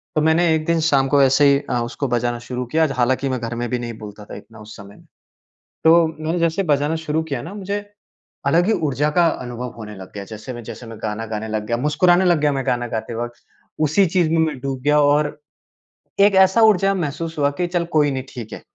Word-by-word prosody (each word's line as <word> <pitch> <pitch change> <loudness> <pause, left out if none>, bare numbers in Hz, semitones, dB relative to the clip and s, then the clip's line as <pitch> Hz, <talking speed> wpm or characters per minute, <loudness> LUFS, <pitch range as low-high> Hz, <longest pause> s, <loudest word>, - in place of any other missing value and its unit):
तो 155 - +2
मैंने 160 +1 +3
एक 155 0 -2
दिन 170 -1 +1
शाम 135 -1 +3
को 140 0 +3
ऐसे 135 +2 +4
ही 140 - +2
अ, 120 - 0
उसको 130 +4 -4
बजाना 120 0 -1
शुरू 125 +1 -5
किया। 160 0 +3
हालाँकि 130 +2 +1
मैं 130 -1 -2
घर 115 +1 -4
में 120 0 -3
भी 125 -1 -1
नहीं 120 -1 -5
बोलता 105 0 -10
था - - -10
इतना 110 +2 -13
उस 105 0 -11
समय 100 -1 -12
में। - - -20 0.8
तो 165 0 +6
मैंने 160 +2 -3
जैसे 170 +3 +1
बजाना 150 -1 +1
शुरू 160 0 -2
किया 140 -6 -4
ना 185 +5 -8
मुझे 200 0 -3 0.7
अलग 170 +6 +3
ही 225 - +3
ऊर्जा 150 -2 0
का 175 -1 +5 0.2
अनुभव 125 0 -6
होने 105 -1 -8
लग 95 -1 -11
गया। 100 -1 -6
जैसे 110 +4 -8
मैं 120 - -8
जैसे 120 - -9
मैं 115 -1 -9
गाना 110 +1 -3
गाने 110 0 -5
लग 105 -1 -3
गया, 115 - 0
मुस्कुराने 175 +7 +3
लग 175 -4 +3
गया 150 -1 +2
मैं 135 -1 -3
गाना 120 -1 0
गाते 115 +1 -4
वक़्त। 120 +1 -6 0.4
उसी 155 +6 +3
चीज़ 170 -2 +1
में 165 - +2
मैं 150 -4 -4
डूब 135 -1 -4
गया 150 +1 +3
और 145 +1 +2 0.8
एक 200 -1 +5
ऐसा 190 +4 +5
ऊर्जा 195 -2 +4
महसूस 165 -1 -4
हुआ 140 0 +3
कि 175 - +1
चल 175 -1 -1
कोई 145 -2 +3
नहीं 130 -1 -3
ठीक 120 -4 -8
है। - - -8
140 Hz, 235 wpm, -20 LUFS, 120-165 Hz, 0.8 s, तो